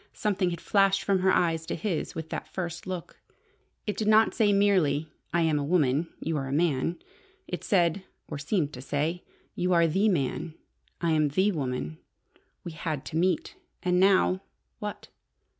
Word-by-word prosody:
Something 195 -3 0
had 170 -1 -4
flashed 195 -1 +3
from 195 -2 +2
her 190 +1 +3
eyes 165 -3 +1
to - - -2
his 195 -7 -3
with 160 0 -5
that - - -4
first 175 -1 -5
look. 185 -2 -6 0.6
It 210 - -2
did 215 - -2
not 220 +1 +5
say 215 -3 +3
merely, 175 -7 +2 0.2
"I 170 - +2
am 160 -2 +2
a - - -1
woman. 150 -1 +2
You 160 -1 -2
are 135 -2 -3
a - - -5
man." 160 +1 +1 0.5
It - - -5
said 180 -2 +2 0.2
or 150 - -5
seemed 150 0 -1
to 125 - -7
say 150 +6 -2 0.3
"You 180 +1 0
are 170 -1 +5
the 190 +7 +2
man. 160 -1 -1 0.5
I 170 -1 +1
am 155 -1 +3
the 190 +8 +2
woman. 125 - -3 0.6
We 170 - -6
had 150 -2 -4
to - - -6
meet. 175 0 +1 0.3
And 180 0 +2
now 190 -1 +4 0.4
what?" 210 0 -6
170 Hz, 175 wpm, -28 LUFS, 150-190 Hz, 0.6 s, not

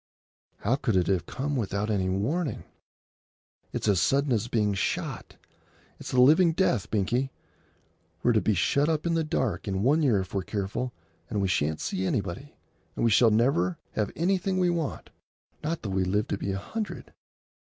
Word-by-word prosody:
"How 120 +6 +1
could 115 -7 0
it 90 -2 +3
have 95 -3 0
come 145 +2 -3
without 105 -2 -1
any 95 -3 0
warning? 130 - -1 1.1
It's - - -3
as 100 -4 +3
sudden 140 0 +2
as 115 0 0
being 105 -4 +1
shot. 95 - -3 0.6
It's - - -7
the 130 - +1
living 160 +6 +6
death, 130 - +1
Binkie. 120 +6 0 0.9
We're 120 - +4
to 110 -2 +3
be 110 - +1
shut 140 - +2
up 155 -1 0
in 170 - +1
the 165 -1 +1
dark 130 - -1
in 95 0 -1
one 150 +6 +3
year 125 -9 +3
if 95 - -9
we're 100 - 0
careful, 105 +6 -3 0.4
and 105 - -1
we 100 - +1
shan't 80 -3 0
see 95 - -2
anybody, 100 +10 -3 0.4
and - - 0
we 115 - +3
shall 115 +2 +6
never 105 -6 +2
have 105 -2 -1
anything 185 +2 0
we 180 -1 +3
want, 165 -4 -3 0.5
not 160 +2 -2
though 105 - -3
we 95 0 +1
live 105 +5 0
to - - -1
be 100 - -2
a 95 - -2
hundred!" 215 - -6
110 Hz, 185 wpm, -27 LUFS, 95-145 Hz, 1.1 s, living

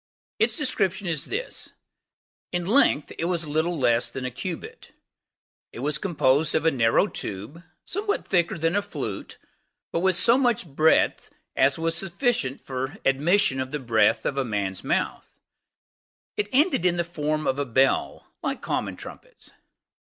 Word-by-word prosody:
Its - - +2
description 195 - 0
is 160 -5 -1
this:In 180 - -7
length 200 - +3
it 165 - 0
was 170 -2 -1
little 160 +3 0
less 120 -3 +2
than 130 +1 -6
a 130 - -3
cubit. 165 +7 -7 0.8
It 115 - -8
was 150 +2 -1
composed 150 -5 +2
of 155 - +1
a 160 - +5
narrow 115 +4 +3
tube, 110 - -6 0.2
somewhat 410 +2 -2
thicker 170 -3 +1
than 165 +2 0
a 205 - +3
flute, 145 - -6 0.5
but - - 0
with 190 +1 +3
so 230 +8 +5
much 240 -7 +2
breadth 155 +1 +2 0.3
as 135 +1 +3
was 165 0 0
sufficient 175 - 0
for 130 +1 -4
admission 145 +2 +3
of 130 0 -2
the 150 - -3
breath 115 -4 +2
of 140 - -1
a - - +2
man's 100 -5 -3
mouth: - - -2 1.0
it 210 - -1
ended 280 - +3
in 175 -1 +2
the 170 - +1
form 155 -2 -2
of 135 +1 0
a - - +1
bell, 135 +1 +1 0.2
like - - -2
common - - -2
trumpets. - - -12
160 Hz, 155 wpm, -25 LUFS, 135-185 Hz, 1.0 s, a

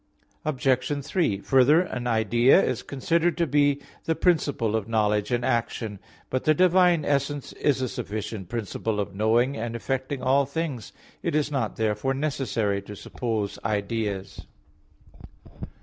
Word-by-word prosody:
Obj. 135 -1 0
3: 145 - 0
Further, 135 +5 +5
an 125 -9 -4
idea 120 - +4
is - - 0
considered 165 +5 0
to 170 - +2
be 145 -1 +2 0.3
the 160 - +1
principle 145 - +1
of 110 -2 -2
knowledge 105 -2 +1
and 120 0 0
action. 115 -3 -1 0.3
But 130 - -1
the 155 - +4
divine 180 -2 +4
essence 140 0 -1
is 135 -3 0
a - - 0
sufficient 105 -4 -5
principle 110 -1 -3
of 100 -1 -3
knowing 115 +6 +2
and 115 +1 -4
effecting 130 +2 -3
all 135 +1 +3
things. 140 -6 -4 0.3
It - - -1
is 150 -1 +1
not 130 -7 -1
therefore 110 +5 0
necessary 125 -8 -1
to 105 +1 -10
suppose 110 -1 -3
ideas. 100 -1 -3
125 Hz, 140 wpm, -25 LUFS, 110-145 Hz, 0.3 s, Further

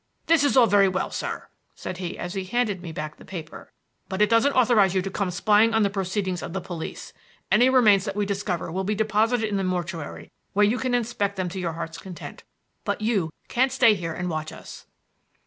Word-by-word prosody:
"This 330 -3 +4
is 285 -2 +2
all 250 - +8
very 200 -2 +5
well, 185 0 -1
sir," - - -4 0.3
said 180 - -6
he 180 -2 -5
as 175 +1 -5
he 195 -2 -3
handed 205 -1 -1
me 170 -2 -7
back 155 -1 -6
the - - -14
paper, 165 -4 -9 0.4
"but 190 0 -3
it 210 +2 +3
doesn't 230 +5 +4
authorize 220 -7 +4
you 190 - +3
to 195 - -4
come 200 -1 -1
spying 210 +5 +3
on 220 - +4
the 200 - +1
proceedings 190 -2 -2
of 170 - -6
the 190 - -1
police. 175 -3 -7 0.4
Any 250 +2 +5
remains 215 -7 +5
that 195 - -4
we 205 0 0
discover 195 -4 -2
will 190 +3 -2
be 210 +2 -1
deposited 220 +2 +1
in 205 -1 -1
the 195 - -1
mortuary, 175 -4 -4 0.2
where 205 +1 +4
you 225 +4 +1
can 255 -1 0
inspect 225 -4 -1
them 185 -2 -2
to 190 - -6
your 170 -2 -2
heart's 165 0 -6
content; 180 0 -9 0.4
but - - -2
you 205 -8 0 0.2
can't 260 +2 +2
stay 245 -4 +5
here 170 -5 -4
and 180 - -3
watch 155 -2 -3
us." - - -11
195 Hz, 220 wpm, -25 LUFS, 180-220 Hz, 0.4 s, all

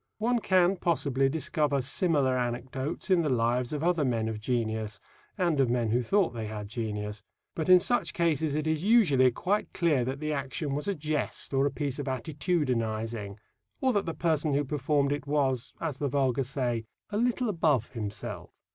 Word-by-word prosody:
One 235 +2 +1
can, 185 -2 +3
possibly, 140 -6 +1
discover 150 -1 0
similar 135 0 +1
anecdotes 130 - -3
in 180 -2 +5
the 155 - 0
lives 120 0 +1
of 150 0 -3
other 170 -3 +2
men 115 -4 0
of 110 -1 -3
genius 110 -3 -2 0.4
and 170 -5 +1
of 130 -3 +3
men 120 -2 +1
who 120 +2 +2
thought 190 - +2
they 115 -2 -4
had 105 -1 -6
genius. 105 -2 -4 0.3
But 160 +2 -3
in 185 0 +9
such 245 +7 0
cases 160 -3 +1
it 155 0 -1
is 155 0 0
usually 180 - +5
quite 195 - -1
clear 155 -8 +2
that 135 +2 -3
the 155 0 -2
action 140 +1 -3
was 145 +5 -2
a 200 - 0
jest 150 -3 -2
or 135 +1 +3
a - - -2
piece 145 -2 -3
of 145 - -4
attitudinizing, 120 - -2 0.4
or 260 -1 +2
that 200 -3 0
the 165 - -3
person 155 -3 +1
who 145 +1 +1
performed 140 0 +1
it 145 -1 -3
was, 135 -4 0
as 155 -5 -3
the 145 - 0
vulgar 135 -1 +1
say, 120 -4 -2 0.3
"a 205 - -1
little 245 +2 +1
above 155 - +1
himself." 105 -3 -5
140 Hz, 185 wpm, -29 LUFS, 120-160 Hz, 0.4 s, in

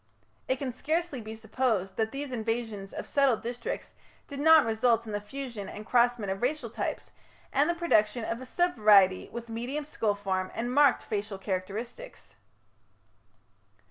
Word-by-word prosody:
It 260 - +2
can 265 -1 -4
scarcely 310 +2 -2
be 220 0 -7
supposed 220 -3 -1
that 220 0 0
these 280 0 -5
invasions 225 -4 -3
of - - -6
settled 275 -5 +2
districts 240 0 -5 0.3
did 280 -1 -7
not 320 0 +7
result 230 +1 +2
in 220 - -6
the 205 0 -2
fusion 235 -2 -6
and 210 - -8
crossment 240 -4 +2
of 195 - -4
racial 300 +5 -1
types - - -4 0.4
and - - +3
the 345 - +1
production 225 -9 +2
of 230 +2 -3
a 255 - -8
sub 350 +1 +1
variety 200 -4 +5
with 235 0 -7
medium 245 +6 -4
skull 220 -8 -1
form 190 -2 -2
and 240 +2 -2
marked 285 -2 +5
facial 205 -1 -3
characteristics. 205 - -5
235 Hz, 160 wpm, -29 LUFS, 210-270 Hz, 0.4 s, not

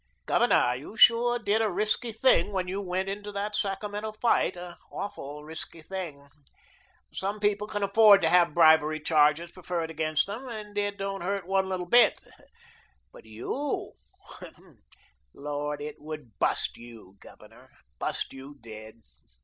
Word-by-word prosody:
Governor, 125 - +3
you 145 - -10
sure 240 +1 +6
did 215 -1 +1
a 220 - +1
risky 215 +5 0
thing 220 -4 +3
when 185 -2 -2
you 195 +2 -3
went 185 0 -2
into 205 +1 -5
that 205 +1 -3
Sacramento 210 +1 -3
fight, 215 -4 +1
an 175 0 -8 0.2
awful 150 -7 -7
risky 160 +1 -8
thing. 160 -7 -7 0.9
Some 200 +2 -3
men 205 0 +2
can 205 -1 -2
afford 200 0 +6
to 160 - +4
have 175 -3 +4
bribery 155 -2 +5
charges 155 +2 +2
preferred 170 -3 -4
against 155 -1 0
them, 225 +7 -7
and 215 -3 -8
it 205 0 -1
don't 195 0 -4
hurt 195 +1 -2
one 190 0 0
little 185 -1 -3
bit, 240 +7 +5 0.9
but - - -15
YOU 120 - -4 1.4
Lord, 145 +1 -4
it 150 0 -7
would 150 -7 -9
BUST - - 0
you, 115 -5 -14
Governor, - - -17 0.3
bust - - -3
you 135 +2 -11
dead. 110 0 -12
185 Hz, 145 wpm, -27 LUFS, 150-205 Hz, 1.4 s, sure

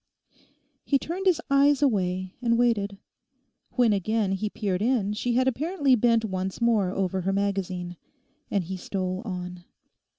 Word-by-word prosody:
He 280 - +2
turned 360 +7 -3
his 350 -3 +4
eyes 280 +1 +4
away 185 -6 0
and 235 -1 +2
waited. 205 -5 +1 0.8
When 240 -4 +3
again 205 +1 0
he 195 +2 -1
peered 195 -3 -2
in 220 -4 +1
she 240 +3 -1
had 255 +2 +2
apparently 285 +2 +1
bent 230 -1 +3
once 190 -2 -3
more 225 -5 +2
over 190 0 -1
her 190 +2 0
magazine, 190 -3 -2 0.5
and 200 -2 0
he 190 +3 -5
stole 185 0 -3
on. 180 -3 -6
205 Hz, 145 wpm, -26 LUFS, 185-245 Hz, 0.8 s, his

